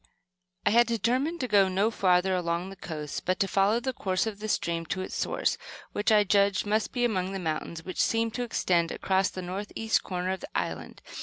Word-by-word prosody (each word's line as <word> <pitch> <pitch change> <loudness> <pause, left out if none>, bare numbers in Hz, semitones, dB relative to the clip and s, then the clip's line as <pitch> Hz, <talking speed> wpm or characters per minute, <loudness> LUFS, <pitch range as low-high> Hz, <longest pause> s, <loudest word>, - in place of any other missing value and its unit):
I - - +4
had 235 +2 +5
determined 250 - 0
to 255 - -1
go 200 -3 +5
no 195 +4 +1
further 185 -2 +2
along 175 +1 -1
the - - -9
coast, 155 -5 -6
but 185 0 0
to 195 - +2
follow 200 +4 +3
the 260 +1 -2
course 185 -4 0
of 215 -2 -4
the 215 - -4
stream 170 -4 0
to 185 - -2
its - - -6
source - - 0 0.3
which 205 +2 0
I 210 -1 +6
judged 200 0 +2
must 215 +1 0
be 245 -1 +1
among 190 -4 -1
the - - -2
mountains 165 -1 -4
which 185 - -2
seemed 225 0 +1
to 245 - -3
extend 175 -7 +1
across 190 0 +1
the 185 - -7
northeast 205 +4 -1
corner 180 0 -3
of 190 - -3
the 290 - -9
island. - - -4
195 Hz, 215 wpm, -28 LUFS, 185-220 Hz, 0.3 s, I